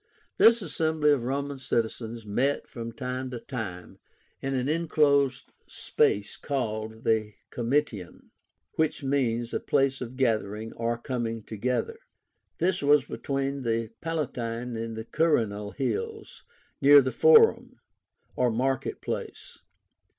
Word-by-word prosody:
This 230 -1 +6
assembly 160 -2 +1
of 140 -4 +2
Roman 140 +1 -2
citizens 115 -2 -2
met, 125 +7 0
from 115 -1 -7
time 130 +1 -4
to 125 -2 -6
time, 110 -9 -7 0.4
in 135 0 -2
an 130 0 -1
enclosed 145 -4 +2 0.2
space 100 0 0
called 110 -5 -3
the 110 -2 +1 0.2
COMITIUM, 120 -6 -2 0.5
which 160 -2 0
means 120 -4 0
a - - 0
place 135 -1 +1
of 125 0 -6
gathering 110 -3 -1
or 115 0 -2
coming 115 -2 -3
together. 125 - -2 0.6
This 180 +1 +1
was 145 -1 +4
between 140 -1 -3
the 115 -2 -1
Palatine 125 -7 -3
and 115 0 -4
Quirínal 110 -6 0
hills 435 - -4 0.4
near 145 +1 +9
the 130 0 -2
FORUM, 455 -1 +5 0.6
or 125 -1 +2
market 130 +3 -1
place. - - -6
125 Hz, 120 wpm, -27 LUFS, 115-145 Hz, 0.6 s, near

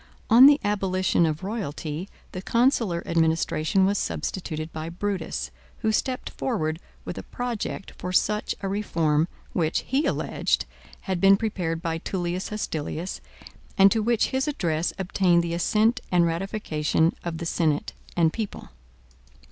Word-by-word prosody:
On 245 +4 +10
the 290 0 +6
abolition 185 -4 +2
of 155 +1 -3
royalty 180 -4 -4 0.2
the 185 - -5
consular 230 -6 +2
administration 165 +2 +2
was 200 +1 +1
substituted 160 -4 -3
by 160 +1 -4
Brutus, 195 +3 -3 0.3
who 220 - +2
stepped 255 +4 -1
forward 160 -11 -2 0.3
with - - -5
a - - -11
project 245 -5 -4
for 180 - -4
such 210 +3 +1
a 195 - -2
reform, 165 -6 +1 0.3
which, 160 -2 +1
he 275 +4 0
alleged, - - 0 0.4
had 190 -3 -2
been 195 0 +7
prepared 180 -7 -2
by 165 -1 -1
Tullius 180 +1 -3
Hostilius, 170 -4 -4 0.6
and 195 0 +7
to 220 - +2
which 230 0 +2
his 265 +2 0
address 170 - 0
obtained 180 -2 +2
the 170 0 -2
assent 215 +7 +2
and 175 -1 +4
ratification 165 -3 0
of 170 -2 -3
the 170 - -5
senate 155 -3 0 0.2
and 165 -2 +3
people. 220 -3 -5
185 Hz, 140 wpm, -25 LUFS, 165-210 Hz, 0.6 s, On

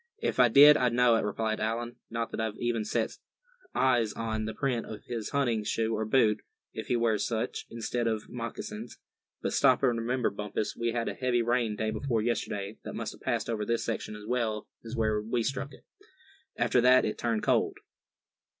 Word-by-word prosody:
"If - - -1
I 125 - +8
did, 145 +5 +8
I'd 125 -2 +2
know 120 -1 +5
it," - - +1
replied 110 +1 -1
Allan; 115 +2 -2
"not 115 0 -3
that - - -5
I've 110 -1 -3
even 120 -2 -1
set - - -2 0.6
eyes 120 -5 +3
on 110 -1 -2
the 110 - -4
print 130 -5 -1
of 105 -2 -8
his 115 -3 -4
hunting 120 -6 +1
shoe 110 +1 0
or 110 - -1
boot, 110 -2 +3 0.3
if - - -6
he 125 - +1
wears 115 -3 +1
such, 115 -1 -3
instead 115 +1 -2
of 110 -2 -2
moccasins; 115 -1 -6 0.5
but - - -1
stop - - +4
and 120 -3 +3
remember, 120 +1 0
Bumpus 105 +1 -3
we 115 0 -1
had 115 -1 -1
a - - -1
heavy 125 -2 +1
rain 120 -2 +1
day 110 +1 -1
before 115 -3 -1
yesterday 105 -3 -2
that - - -6
must - - -3
have - - -15
passed - - -1
over 110 -2 -1
this 115 +2 -1
section 110 -2 -3
as 105 0 -10
well 110 -3 -1 0.2
as 115 +2 -6
where 110 -2 +1
we 115 +2 -1
struck 135 +3 -3
it. - - -16 0.7
After 125 - +3
that 125 +1 +6
it 105 - -3
turned 115 -2 0
cold." - - +2
115 Hz, 200 wpm, -29 LUFS, 110-120 Hz, 0.7 s, I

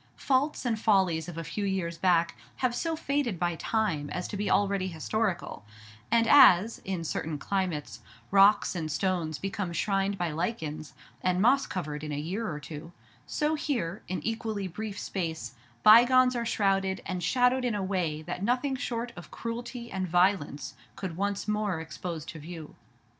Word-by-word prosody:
Faults 275 +1 +1
and 225 -3 0
follies 185 -7 +2
of 170 - -8
a 165 - -3
few 205 +5 -4
years 180 -4 -2
back 170 -6 +3 0.2
have 255 -2 0
so 325 +6 -1
faded 280 - -1
by 175 0 0
time 165 -7 -1
as - - -3
to - - -5
be 205 +1 -1
already 200 -2 +2
historical; 180 - -2 0.5
and 230 0 +4
as, 225 -5 +7
in 185 -3 -4
certain 155 -1 -3
climates, 155 - -2 0.3
rocks 200 +1 +5
and 160 -4 -3
stones 170 -2 -1
become 195 +2 -3
shrined 195 +3 0
by 175 -3 -1
lichens, 155 -3 -4 0.3
and 180 0 +1
moss 255 +7 +4
covered 150 -5 -4
in 150 - -4
a 145 - -2
year 180 +7 -3
or 150 - -5
two, 150 +4 -9 0.4
so 300 0 0
here, 235 - -2
in 180 -4 -3
equally 220 -3 -2
brief 205 +3 -6
space, 160 -9 -4 0.3
bygones 250 +3 +7
are 235 -1 -1
shrouded 195 -3 +1
and 185 -1 -3
shadowed 250 +7 +2
in 240 -4 0
a 200 - -1
way 175 -5 -1
that 180 - -5
nothing 250 +6 +1
short 240 -2 -3
of 175 -3 -10
cruelty 235 +1 -6
and 190 -1 -2
violence 175 -5 +1 0.2
could 185 -4 -5
once 200 +2 -2
more 210 -4 0
expose 160 0 -6
to 165 - -8
view. 160 0 -9
190 Hz, 170 wpm, -28 LUFS, 165-225 Hz, 0.5 s, as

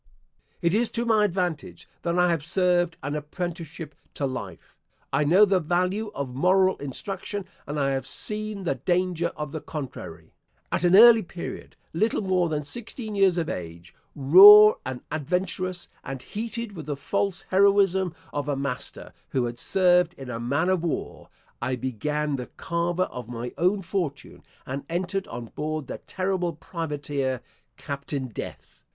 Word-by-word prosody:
It 170 +1 +2
is 230 +2 +3
to 235 0 -1
my 220 -2 +4
advantage 175 - -3
that 170 0 -1
I 180 0 +4
have 165 -4 -1
served 175 0 +1
an 145 +1 -3
apprenticeship 160 0 -5 0.2
to 140 - -1
life. 130 -1 -6 0.4
I - - +3
know 180 +8 +6
the 195 -2 +2
value 180 +6 0
of 135 -3 -4
moral 185 +6 +3
instruction, 190 +8 -5 0.2
and 145 +1 -3
I 140 -1 +1
have 135 -1 -2
seen 215 -2 -3
the 180 - +1
danger 175 -1 0
of 150 -2 -4
the 155 - -5
contrary. 145 -5 -8 0.4
At - - 0
an 175 +1 +5
early 230 +1 +9
period 175 -1 -8 0.2
little 215 +5 +1
more 185 -3 +1
than 150 -1 -2
sixteen 220 - -6
years 195 -3 +3
of 165 -2 0
age, 85 0 -7 0.2
raw 200 +9 +10 0.2
and 130 -1 -5
adventurous, 180 +3 -2 0.2
and 135 -1 -6
heated 230 +1 -5
with 160 -3 -8
the 145 -2 -3
false 195 +6 -1
heroism 190 -2 +3 0.2
of 145 0 -2
a 145 - +1
master* 135 -2 -5 0.2
who 130 -2 0
had 120 0 -5
served 180 0 +3
in 130 -2 -8
a 115 - -4
man 140 +9 0
of 185 -3 +2
war 170 - -4 0.3
I 130 - -1
began 140 +4 -2
the 125 - -6
carver 170 +1 0
of 125 -8 -7
my 120 0 -5
own 190 +3 +1
fortune, 175 -6 -4 0.2
and 135 +2 -4
entered 185 +3 -2
on 115 -1 -7
board 155 -1 -3
the - - -7
Terrible 185 -2 -2
Privateer, 145 -5 -3 0.4
Captain 140 -2 -5
Death. 110 - -9
170 Hz, 160 wpm, -25 LUFS, 140-190 Hz, 0.4 s, raw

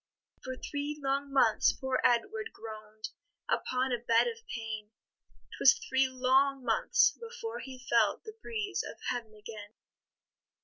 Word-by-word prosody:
For 260 0 -4
three 290 +2 -4
long 275 0 -1
months 250 -5 +4
poor 265 -1 -1
Edward 425 - +2
groan'd 215 -1 -8 0.4
Upon 255 +1 0
a 240 - 0
bed 230 -1 +4
of 460 -1 -4
pain; 220 -2 -5 0.7
'Twas 270 - +8
three 265 0 +3
long 265 +1 +3
months 455 - +4
before 465 0 -7
he 255 -1 -9
felt 235 - +3
The 435 - -8
breeze 420 -3 -2
of - - -8
heaven 230 -3 -5
again. 210 0 -10
260 Hz, 135 wpm, -31 LUFS, 230-300 Hz, 0.7 s, Twas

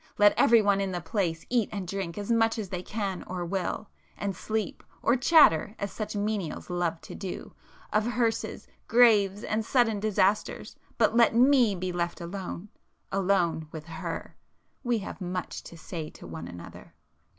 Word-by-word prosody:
Let 205 0 +6
everyone 205 -4 +5
in 195 -1 -1
the 175 - -1
place 165 -1 -2
eat 240 -4 +1
and 195 -3 -4
drink 190 -2 -4
as 205 +2 -3
much 225 0 +3
as 210 -4 -4
they 180 -1 -3
can 195 -1 -3
or 180 -1 -3
will,—and 195 +2 -4
sleep, 215 +2 -3 0.2
or 235 - +4
chatter 245 - +5
as 200 -1 -4
such 215 -1 -5
menials 205 -5 -2
love 175 -2 -1
to - - -10
do, 190 -3 -6 0.4
of 215 +1 +2
hearses, 230 -1 -1 0.2
graves 210 -4 +5
and 220 +1 -1
sudden 225 -3 +2
disasters;—but 215 +2 0
let 235 -1 +5
me 250 -4 +5
be 185 0 -3
left 175 -1 -2
alone,—alone 185 -1 -2
with 155 -1 -8
her;—we 235 +7 -5
have 195 -1 -7
much 180 0 -4
to 170 - -10
say 160 -1 -6
to - - -13
one 80 0 -7
another!" 85 -1 -11
200 Hz, 150 wpm, -28 LUFS, 175-220 Hz, 0.4 s, Let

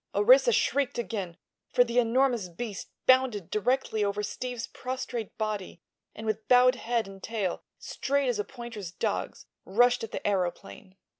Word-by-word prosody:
Orissa - - +6
shrieked 280 - +1
again, 200 -7 -4 0.3
for 245 - +5
the 240 0 +1
enormous 240 -4 +2
beast 200 +4 -6 0.2
bounded 255 -8 +3
directly 220 0 0
over 205 +1 -1
Steve's 245 +2 -4
prostrate 255 -3 -5
body 210 -5 -3 0.4
and 220 - -7
with 215 -1 -2
bowed 250 0 +6
head 235 -3 -1
and 195 0 -11
tail 205 -5 -2 0.2
straight 280 0 -1
as 240 -4 0
a - - +1
pointer 235 -2 -8 0.2
dog's - - -2 0.2
rushed 245 +5 +3
at 225 - -5
the - - -3
aëroplane. 190 0 -3
230 Hz, 150 wpm, -28 LUFS, 205-250 Hz, 0.4 s, Orissa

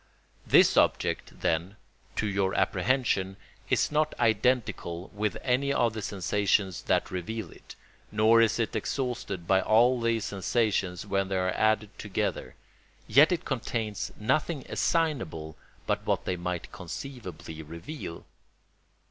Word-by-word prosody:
This - - +6
object, - - +1
then, 85 +5 0 0.4
to - - 0
your 95 -2 0
apprehension, 100 -7 +1 0.3
is - - +2
not 155 0 +1
identical 110 -6 +1
with 105 0 -1
any 135 +2 +1
of 120 -4 +2
the 110 - -4
sensations 100 -1 0
that - - +1
reveal 95 +1 -4
it, - - -14 0.4
nor 110 +2 +5
is 115 -2 +3
it 115 -2 -1
exhausted 125 -9 -3
by 95 +2 +3
all 120 +3 +4
these 115 -2 +1
sensations 100 -2 0
when 95 -1 0
they 95 0 -1
are 90 0 +1
added 110 -1 +1
together; 100 -4 -3 0.5
yet 145 - +6
it 175 - -1
contains 115 -5 -3
nothing 135 +6 0
assignable 120 - -1 0.3
but - - -1
what - - 0
they 90 - -1
might 90 0 -4
conceivably 90 - -7
reveal. 85 - -8
105 Hz, 130 wpm, -28 LUFS, 95-120 Hz, 0.5 s, This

